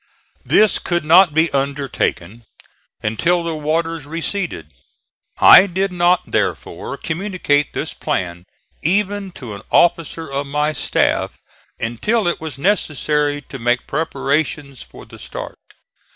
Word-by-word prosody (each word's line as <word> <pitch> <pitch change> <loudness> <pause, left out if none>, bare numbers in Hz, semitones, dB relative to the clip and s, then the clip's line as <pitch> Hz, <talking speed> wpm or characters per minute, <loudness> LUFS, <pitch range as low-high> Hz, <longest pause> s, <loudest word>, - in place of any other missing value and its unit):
This 215 -1 +3
could 175 -3 -2
not 175 +2 +6
be 160 +2 +2
undertaken 135 -7 -2 0.6
until 170 +12 +1
the 165 -1 -3
waters 160 0 -2
receded. 165 - -4 0.7
I 195 - +8
did 190 +1 -1
not 175 0 +2
therefore - - -2
communicate 175 -6 -1
this - - -4
plan, 90 -1 -3 0.4
even 200 +3 0
to 120 -5 -8
an 100 - -8
officer 165 -1 +2
of 140 +1 -3
my 150 +2 0
staff, 135 - 0 0.4
until 185 - -1
it 175 - -1
was 155 -5 -6
necessary 150 -4 0
to 135 - -9
make 120 +1 0
preparations 145 -2 -2
for - - -13
the - - -14
start. - - -7
155 Hz, 125 wpm, -19 LUFS, 140-175 Hz, 0.7 s, I